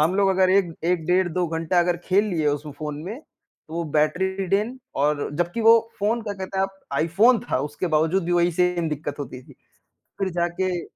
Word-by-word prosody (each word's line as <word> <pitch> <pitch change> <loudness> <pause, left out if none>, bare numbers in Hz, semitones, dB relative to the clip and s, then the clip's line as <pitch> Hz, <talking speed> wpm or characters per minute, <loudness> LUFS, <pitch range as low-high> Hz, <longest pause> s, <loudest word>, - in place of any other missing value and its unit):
हम 160 +4 +3
लोग 200 -1 +3
अगर 185 -1 +3
एक 190 -3 +3
1 175 -2 +1
डेढ़ 180 0 +3
2 180 +1 0
घंटा 165 +2 0
अगर 175 0 +1
खेल 195 +3 +3
लिए 170 -7 -1
उसमें 145 +1 -3
फ़ोन 150 -1 -4
में, 220 +9 -6
तो 160 - -18
वो 170 - -1
बैटरी 190 +5 +1
ड्रेन 215 +7 0 0.2
और 145 +1 +1
जबकि 175 +6 -1
वो 230 +1 +8 0.2
फ़ोन 225 +3 +1
क्या 205 -2 -4
कहते 190 0 -5
हैं 190 - +3
आप 195 0 -19 0.2
iPhone 210 +9 +4
था, - - +2
उसके 150 +5 -3
बावजूद 160 +3 +1
भी 175 - -1
वही 175 0 +3
सेम 180 -1 +1
दिक्कत 145 -1 -4
होती 130 -2 -7
थी। - - -17 0.7
फिर 195 -1 0
जाके 175 +1 -1
180 Hz, 210 wpm, -23 LUFS, 160-195 Hz, 0.7 s, वो